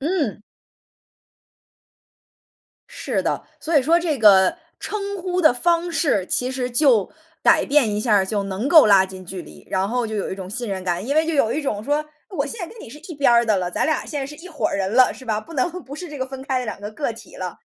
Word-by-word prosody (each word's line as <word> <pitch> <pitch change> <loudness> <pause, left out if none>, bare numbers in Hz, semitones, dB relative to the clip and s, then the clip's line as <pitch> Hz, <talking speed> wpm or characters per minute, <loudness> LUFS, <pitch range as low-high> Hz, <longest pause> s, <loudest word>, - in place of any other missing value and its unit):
嗯。 290 - -1 2.5
是 - - -3
的， - - -1 0.2
所 320 -1 0
以 275 - +5
说 330 +5 +4
这 320 -6 -1
个 195 -4 +6 0.2
称 400 -1 -4
呼 365 0 -2
的 310 -7 +6
方 340 +6 +1
式， 240 - +1
其 250 +1 -1
实 255 -1 -3
就 240 -6 +3 0.3
改 - - +5
变 270 -7 +2
一 210 - -1
下 215 -1 +2
儿， 190 -2 +3
就 205 0 -1
能 195 +7 -3
够 315 -7 +8
拉 195 -2 +6
近 185 -1 -10
距 180 0 -7
离， 75 -1 -15
然 190 +1 0
后 245 0 -1
就 220 - -5
有 205 - -2
一 - - -3
种 190 -1 -8
信 235 +2 -4
任 190 -1 -3
感。 175 +4 -2
因 285 - -1
为 315 +1 +3
就 330 - -1
有 230 -6 +2
一 305 - -1
种 210 -7 -2
说， 295 +4 0 0.2
我 305 -8 -2
现 430 - -7
在 350 - -3
跟 455 +6 -13
你 - - -10
是 290 +6 -11
一 335 - -5
边 280 -3 +3
儿 235 0 +5
的 215 -3 +2
了， 180 -1 -2
咱 - - 0
俩 315 - 0
现 295 -2 -4
在 270 - -3
是 295 - -9
一 365 +4 -11
伙 305 - -2
人 195 +1 -2
了， 255 +1 +5
是 260 - -13
吧？ 215 -2 -1
不 330 - -14
能 275 +6 +1
不 275 - -9
是 350 +3 -7
这 295 -2 -8
个 260 - -2
分 265 0 -8
开 265 -2 -1
的 250 - -4
两 215 -2 -6
个 205 +1 -6
个 240 +1 -3
体 225 - -14
了。 180 -2 -6
250 Hz, 270 characters per minute, -22 LUFS, 205-300 Hz, 2.5 s, 够